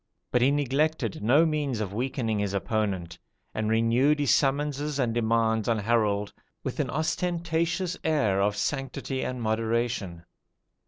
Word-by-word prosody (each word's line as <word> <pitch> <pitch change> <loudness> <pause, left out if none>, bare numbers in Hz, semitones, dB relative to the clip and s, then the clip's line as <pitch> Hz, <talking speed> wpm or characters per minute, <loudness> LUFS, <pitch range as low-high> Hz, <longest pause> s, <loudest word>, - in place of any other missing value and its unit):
But 125 - +2
he 130 - +5
neglected 145 -3 0
no 135 +10 +5
means 145 -6 -1
of 100 -3 -3
weakening 115 -2 -1
his 100 -1 -1
opponent, 100 -4 -2 0.3
and 110 -1 -1
renewed 115 +6 +3
his 145 -3 +3
summonses 145 +1 0
and 120 -4 0
demands 115 -1 +1
on 115 - +2
Harold 105 -2 +1 0.3
with - - -4
an - - 0
ostentatious 170 +3 -1
air 135 -12 +2
of 105 +1 +1
sanctity 135 -1 -2
and 125 -1 -3
moderation. 110 -5 -1
120 Hz, 140 wpm, -27 LUFS, 110-145 Hz, 0.3 s, he